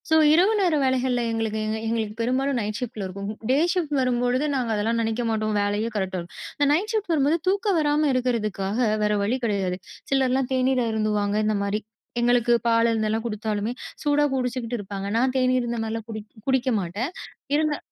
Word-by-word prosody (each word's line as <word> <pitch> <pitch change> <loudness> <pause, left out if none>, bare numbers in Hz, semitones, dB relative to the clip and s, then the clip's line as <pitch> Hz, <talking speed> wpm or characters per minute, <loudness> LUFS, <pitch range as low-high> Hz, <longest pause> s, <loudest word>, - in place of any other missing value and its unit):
So, 320 - +4 0.2
இரவு 370 +7 +5
நேர 355 -5 +3
வேலைகள்ல 260 -1 +1
எங்களுக்கு 225 -1 -1
எங்க 215 0 -1
எங்களுக்கு 220 -2 -2
பெரும்பாலும் 260 +3 +1
நைட் 210 -1 -3
ஷிஃப்ட் 245 -2 -5
ல - - -2
இருக்கும். 200 +2 -6 0.2
டே 265 - +4 0.2
ஷிஃப்ட் 345 -6 -1
ன்னு 275 - +2
வரும்பொழுது 250 +2 +1
நாங்க 250 -3 -1
அதெல்லாம் 225 +3 0
நினைக்க 225 +1 -1
மாட்டோம், 215 -1 0
வேலையே 205 +2 0
கரெக்டா 190 -2 -1
இருக்கும். 170 0 -10 0.2
இந்த 285 - +3
நைட் 400 +9 0
ஷிஃப்ட் 420 -5 -1
வரும்போது 300 +2 +3
தூக்கம் 395 0 +2
வராம 300 0 +2
இருக்கிறதுக்காக, 220 -5 -1 0.2
வேற 210 - +2
வழி 230 +6 +1
கிடையாது. 195 -4 0 0.3
சிலர்லாம் 265 -1 +2
தேநீர் 255 0 +2
அருந்துவாங்க, 210 -2 0
இந்தமாரி. 205 0 0 0.4
எங்களுக்கு 240 0 +3
பால் 230 0 +4
இருந்தெல்லாம் 220 0 0
கொடுத்தாலுமே, 215 0 -2 0.3
சூடா 295 -1 +3
குடிச்சுக்கிட்டு 250 -2 -2
இருப்பாங்க. 195 0 -5
நான் 255 +2 +2
தேநீர் 255 0 +3
இருந்தமாரிலாம் 225 -1 -3
குடி 215 -1 -5 0.3
குடிக்க 265 -1 +2
மாட்டேன். 200 - -3 0.4
இருந்தா 305 -1 +1
235 Hz, 170 wpm, -24 LUFS, 215-265 Hz, 0.4 s, இரவு